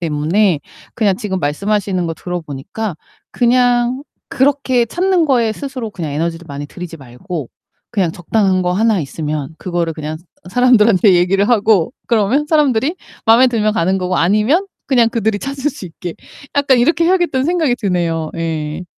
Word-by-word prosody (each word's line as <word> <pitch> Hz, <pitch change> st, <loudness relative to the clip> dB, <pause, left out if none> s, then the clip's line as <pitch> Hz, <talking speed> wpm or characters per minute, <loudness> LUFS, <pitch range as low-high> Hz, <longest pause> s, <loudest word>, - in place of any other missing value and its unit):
때문에 165 Hz, +3 st, +1 dB, 0.4 s
그냥 200 Hz, -4 st, +1 dB
지금 190 Hz, -3 st, -3 dB
말씀하시는 190 Hz, +4 st, -1 dB
거 165 Hz, -, -3 dB
들어보니까 175 Hz, +3 st, -5 dB, 0.3 s
그냥 245 Hz, +1 st, +2 dB, 0.3 s
그렇게 265 Hz, -3 st, +2 dB
찾는 355 Hz, +6 st, +1 dB
거에 235 Hz, -5 st, +2 dB
스스로 255 Hz, -4 st, -6 dB
그냥 165 Hz, -7 st, -5 dB
에너지를 165 Hz, +3 st, -3 dB
많이 145 Hz, +1 st, -6 dB
들이지 175 Hz, +1 st, -8 dB
말고 140 Hz, -, -7 dB, 0.4 s
'그냥 185 Hz, -6 st, +1 dB
적당한 185 Hz, +2 st, 0 dB
거 180 Hz, 0 st, 0 dB
하나 215 Hz, +1 st, +2 dB
있으면 150 Hz, 0 st, -4 dB
그거를 170 Hz, -2 st, -2 dB
그냥 155 Hz, 0 st, -5 dB, 0.3 s
사람들한테 225 Hz, -5 st, +4 dB
얘기를 195 Hz, +4 st, +2 dB
하고 220 Hz, -2 st, +3 dB, 0.2 s
그러면 235 Hz, +6 st, +2 dB
사람들이 295 Hz, +1 st, +2 dB, 0.3 s
마음에 235 Hz, +3 st, +6 dB
들면 215 Hz, -3 st, +1 dB
가는 190 Hz, -3 st, +1 dB
거고 185 Hz, 0 st, -1 dB
아니면 215 Hz, -, +2 dB, 0.2 s
그냥 240 Hz, -4 st, +4 dB
그들이 220 Hz, -2 st, -1 dB
찾을 275 Hz, +3 st, -3 dB
수 195 Hz, -, -9 dB
있게 175 Hz, 0 st, -7 dB, 0.4 s
약간 275 Hz, -3 st, +4 dB
이렇게 330 Hz, +7 st, +3 dB
해야겠다.'는 345 Hz, -7 st, +2 dB
생각이 320 Hz, -8 st, +1 dB
드네요. 170 Hz, -5 st, -1 dB
예. 160 Hz, -1 st, -3 dB
205 Hz, 365 characters per minute, -17 LUFS, 170-245 Hz, 0.4 s, 마음에